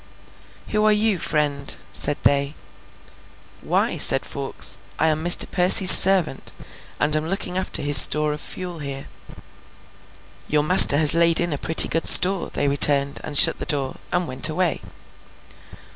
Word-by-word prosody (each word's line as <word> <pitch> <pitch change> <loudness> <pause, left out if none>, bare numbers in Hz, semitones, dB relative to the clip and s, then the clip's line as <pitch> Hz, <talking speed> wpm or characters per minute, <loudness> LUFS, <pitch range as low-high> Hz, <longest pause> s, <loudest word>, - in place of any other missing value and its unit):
'Who 215 0 -3
are 215 - +1
you, 210 -2 -2
friend?' 145 -3 -4 0.2
said 145 - +2
they. 140 +1 -2 1.1
'Why,' - - -4
said - - +4
Fawkes, - - -4 0.2
'I 160 - -2
am 155 0 -5
Mr. 175 0 +3
Percy's 185 +1 +6
servant, 185 -8 +3 0.5
and 150 +1 -1
am 155 +1 -5
looking 180 0 -7
after 185 -5 -4
his 145 -2 +6
store 150 0 +1
of 150 - -10
fuel 180 -2 -9
here.' 140 -1 -8 1.4
'Your 150 0 -2
master 155 -3 +4
has 150 -1 +3
laid 170 0 +1
in 175 -2 -4
a - - -6
pretty 160 - +1
good 165 - -3
store,' 185 0 +3
they 145 - -4
returned, 140 0 -1
and 145 -1 -4
shut - - +3
the - - -7
door, 140 -3 -5
and 180 -1 -4
went 130 +4 -1
away. 175 +1 -4
155 Hz, 155 wpm, -18 LUFS, 145-180 Hz, 1.4 s, Percy's